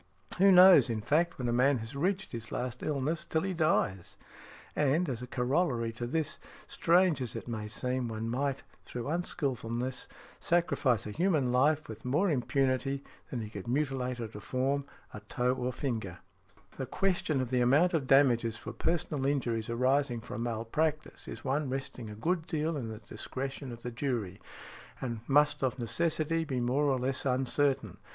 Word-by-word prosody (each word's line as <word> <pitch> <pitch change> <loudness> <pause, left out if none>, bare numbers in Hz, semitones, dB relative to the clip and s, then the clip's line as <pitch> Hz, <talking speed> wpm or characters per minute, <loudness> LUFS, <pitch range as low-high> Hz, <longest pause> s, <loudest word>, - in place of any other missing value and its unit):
Who 195 +1 +7
knows, 180 -5 +8
in 110 -2 -1
fact, 160 +9 +1
when 125 - -2
a 120 - +1
man 130 +3 +4
has 115 +4 -7
reached 185 +6 -1
his 115 -2 -6
last 125 0 -3
illness 150 +2 -1
until 160 - -1
he 190 -1 -1
dies? 155 - 0 0.6
And, 150 +5 +2
as 125 -3 -3
a 125 - -6
corollary 125 -2 0
to 120 +1 -4
this, 155 +3 -2 0.3
strange 170 -4 +3
as 125 - -3
it - - -6
may 110 -3 -4
seem, 125 +3 -2
one 110 0 -4
might, 135 +3 -1 0.2
through 120 0 -6
unskilfulness, 130 -7 -2 0.3
sacrifice 155 - +1
a 105 - -5
human 155 - +1
life 150 +5 +3
with 110 - -9
more 150 +9 +2
impunity 135 +1 0 0.3
than 120 - -3
he 105 - -6
could 100 -1 -7
mutilate 130 -2 -1
or 115 - -3
deform 130 +6 -2 0.3
a - - -6
toe 125 +4 0
or 125 -1 -3
a - - 0
finger". 110 -9 -3 0.6
The 130 - -4
question 175 -7 0
of 130 -1 -2
the 125 -1 +2
amount 145 +9 +4
of 150 -5 0
damages 120 -5 +4
for - - -7
personal 155 -5 -1
injuries 120 -6 -1
arising 130 +1 +1
from 115 - -6
malpractice 120 +7 -2
is - - -8
one 140 +1 0
resting 130 -3 -5
a 105 - -8
good 165 - -1
deal 155 +1 -1
in 130 -6 -3
the 110 - -6
discretion 135 +5 -6
of 120 0 -10
the 125 - -4
jury, 115 -7 -3 0.6
and 120 -4 -3
must 145 +2 +4
of 130 0 0
necessity 165 +6 0
be 135 -5 -2
more 125 +5 +1
or 135 -2 +2
less 130 +1 -1
uncertain. 135 +1 +1
130 Hz, 175 wpm, -31 LUFS, 120-150 Hz, 0.6 s, knows